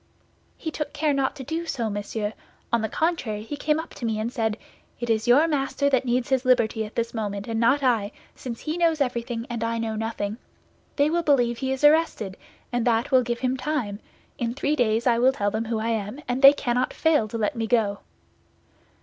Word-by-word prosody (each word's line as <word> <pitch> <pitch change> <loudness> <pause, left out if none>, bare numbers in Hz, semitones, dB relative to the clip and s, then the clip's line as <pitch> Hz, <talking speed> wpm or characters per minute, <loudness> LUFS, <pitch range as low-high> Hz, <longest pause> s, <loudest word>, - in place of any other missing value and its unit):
"He 320 - -4
took 300 -2 -4
care 305 -1 +1
not 275 -1 0
to 270 - -7
do 325 +5 -4
so, 240 -7 -2
monsieur; 205 +1 -3 0.4
on 235 - +3
the 220 - -2
contrary, 260 -11 -1
he 260 +7 -5
came 300 +1 0
up 320 - -7
to - - -11
me 220 -2 -1
and 230 +3 -3
said, 220 -3 -1 0.4
'It 240 0 -1
is 220 +1 0
your 280 +7 +6
master 280 -1 0
that 260 -1 +2
needs 245 0 0
his 265 -1 +2
liberty 235 -3 +2
at 210 - -11
this 235 0 -1
moment 205 -3 -3
and 225 -1 -2
not 265 +5 +3
I, 230 -5 +2 0.2
since 235 -3 -7
he 310 +2 -3
knows 330 -2 +2
everything 240 -3 -2
and 235 -1 -4
I 230 0 -1
know 225 -1 -2
nothing. 215 -1 -3 0.6
They 290 +1 +2
will 340 +1 +2
believe 245 -7 +2
he 265 -1 -1
is 265 +2 -3
arrested, 295 -11 +3 0.4
and 240 -1 0
that 230 +3 +1
will 260 -1 +6
give 240 -1 -3
him 255 0 +1
time; 255 -8 -2 0.4
in 235 0 -2
three 290 +2 0
days 230 -3 +1
I 235 -2 +3
will 260 +2 +4
tell 205 -5 -1
them 220 +2 -2
who 225 0 -2
I 220 +1 -1
am, 220 +3 -2
and 250 +1 -1
they 275 0 +10
cannot 250 -2 -1
fail 310 -9 +2
to 230 - -5
let 220 +5 -1
me 225 -1 -2
go. 215 -4 +1
240 Hz, 220 wpm, -25 LUFS, 225-275 Hz, 0.6 s, they